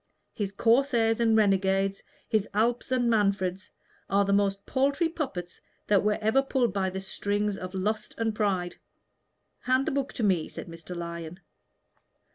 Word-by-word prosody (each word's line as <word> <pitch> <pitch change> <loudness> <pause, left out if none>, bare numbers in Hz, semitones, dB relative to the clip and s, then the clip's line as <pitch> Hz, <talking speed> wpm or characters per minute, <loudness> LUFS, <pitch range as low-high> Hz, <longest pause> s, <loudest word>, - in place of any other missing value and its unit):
His 200 -2 -3
corsairs 230 +1 +2
and 225 -1 +4
renegades, 195 -1 +2 0.3
his 215 -2 0
Alps 235 +4 +1
and 250 -2 +2
Manfreds, 200 -4 +1 0.4
are 200 +1 +3
the 200 - +1
most 200 0 +1
paltry 280 +5 +1
puppets 230 - -5 0.2
that 205 -2 +3
were 210 0 +2
ever 220 +5 +3
pulled 260 -6 0
by 190 -1 0
the 190 +1 -5
strings 205 +1 -2
of 185 0 -7
lust 210 +3 -2
and 225 -1 0
pride." 195 -5 -1 0.8
"Hand 255 +2 +1
the 315 - -1
book 275 -1 -1
to 240 - -3
me," 185 -6 +2
said - - -7
Mr. 165 +1 -9
Lyon. 170 0 -6
205 Hz, 155 wpm, -28 LUFS, 190-235 Hz, 0.8 s, and